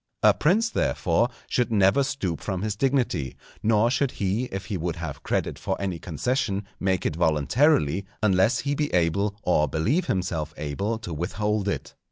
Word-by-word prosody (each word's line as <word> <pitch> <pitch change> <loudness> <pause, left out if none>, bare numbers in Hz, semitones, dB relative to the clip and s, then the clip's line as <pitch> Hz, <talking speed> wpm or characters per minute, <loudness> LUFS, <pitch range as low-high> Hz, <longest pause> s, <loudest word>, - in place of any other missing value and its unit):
A - - +7
prince, 200 +9 +2
therefore, 90 +8 +1 0.2
should 120 -2 0
never 100 +4 +4
stoop 115 - -3
from 95 -2 -3
his 105 -1 -1
dignity, 120 - 0 0.3
nor 110 +2 +3
should 135 0 +1
he 100 +5 -1
if 95 -5 -6
he 105 - -3
would 85 -1 -2
have 80 -5 -6
credit - - -2
for - - -2
any 95 -4 -2
concession 100 - -1
make 95 -1 0
it 75 - 0
voluntarily, 85 - +2 0.2
unless 105 +4 +3
he 140 +2 -1
be 150 +1 -1
able 100 +4 +1
or 75 -4 +3
believe 115 - 0
himself 80 -4 -2
able 95 +10 -2
to 110 -7 -7
withhold 105 +5 -1
it. 100 - -3
100 Hz, 170 wpm, -25 LUFS, 85-120 Hz, 0.3 s, A